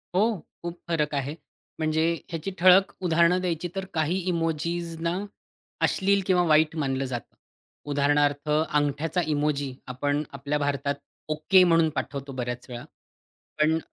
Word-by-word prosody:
हो, 190 Hz, -, +5 dB, 0.4 s
खूप 170 Hz, 0 st, -5 dB
फरक 155 Hz, -3 st, 0 dB
आहे. 140 Hz, +2 st, -2 dB, 0.4 s
म्हणजे 155 Hz, 0 st, +1 dB, 0.3 s
ह्याची 165 Hz, +2 st, -4 dB
ठळक 185 Hz, +2 st, +6 dB
उदाहरणं 170 Hz, +1 st, +4 dB
द्यायची, 175 Hz, -1 st, -2 dB
तर 190 Hz, 0 st, -3 dB
काही 160 Hz, +3 st, +1 dB
इमोजीजनां 170 Hz, +2 st, -2 dB, 0.6 s
अश्लील 200 Hz, 0 st, +2 dB
किंवा 180 Hz, -2 st, +3 dB
वाईट 155 Hz, 0 st, +4 dB
मानलं 135 Hz, -3 st, -1 dB
जातं. 120 Hz, -3 st, -6 dB, 0.6 s
उदाहरणार्थ 145 Hz, +1 st, +2 dB
अंगठ्याचा 150 Hz, +2 st, +1 dB
इमोजी 145 Hz, -3 st, 0 dB, 0.2 s
आपण 145 Hz, +3 st, 0 dB
आपल्या 140 Hz, +2 st, -2 dB
भारतात 140 Hz, 0 st, -1 dB, 0.3 s
ओके 155 Hz, +5 st, +4 dB
म्हणून 165 Hz, -2 st, +4 dB
पाठवतो, 140 Hz, -1 st, -4 dB
बऱ्याच 125 Hz, -1 st, -4 dB
वेळा. 120 Hz, 0 st, -6 dB, 0.8 s
पण 160 Hz, +1 st, +4 dB
155 Hz, 125 wpm, -26 LUFS, 145-170 Hz, 0.8 s, ठळक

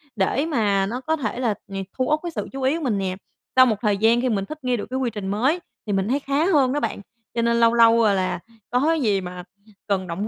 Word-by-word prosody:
để 235 Hz, +9 st, +1 dB
mà 205 Hz, -10 st, +1 dB
nó 245 Hz, +6 st, -4 dB
có 320 Hz, +4 st, 0 dB
thể 245 Hz, -4 st, -3 dB
là 235 Hz, -5 st, +1 dB, 0.2 s
nh -, -, -6 dB, 0.2 s
thu 255 Hz, -, +1 dB
uất 305 Hz, 0 st, +2 dB
cái 345 Hz, -, -4 dB
sự -, -, -4 dB
chú 270 Hz, 0 st, -6 dB
ý 270 Hz, +5 st, +2 dB
của 325 Hz, -, -6 dB
mình 225 Hz, -6 st, 0 dB
nè. 185 Hz, -1 st, -2 dB, 0.4 s
Sau 255 Hz, 0 st, +8 dB
một 220 Hz, -4 st, +2 dB
thời 205 Hz, -3 st, +1 dB
gian 230 Hz, +3 st, +3 dB
khi 255 Hz, -, 0 dB
mình 195 Hz, -3 st, -1 dB
thích 310 Hz, +2 st, -9 dB
nghi 250 Hz, -1 st, +1 dB
được -, -, -4 dB
cái 260 Hz, +1 st, -2 dB
quy 250 Hz, -2 st, 0 dB
trình 210 Hz, -4 st, -6 dB
mới 255 Hz, -, +1 dB, 0.3 s
thì 205 Hz, -, -1 dB
mình 195 Hz, +1 st, 0 dB
thấy 275 Hz, +4 st, +1 dB
khá 280 Hz, +3 st, 0 dB
hơn 280 Hz, -8 st, +3 dB
đó 295 Hz, -, 0 dB
bạn, 200 Hz, -, -3 dB, 0.3 s
cho 235 Hz, -, 0 dB
nên 235 Hz, 0 st, +2 dB
lâu 230 Hz, 0 st, +5 dB
lâu, 230 Hz, 0 st, +6 dB
ờ, 205 Hz, -2 st, +4 dB
là 185 Hz, -2 st, -1 dB, 0.3 s
có 250 Hz, +1 st, +1 dB
cái 325 Hz, -2 st, +2 dB
gì 200 Hz, -5 st, +1 dB
mà 180 Hz, 0 st, -7 dB, 0.4 s
cần 190 Hz, -2 st, 0 dB
động 190 Hz, +6 st, -3 dB
235 Hz, 280 wpm, -23 LUFS, 200-265 Hz, 0.4 s, Sau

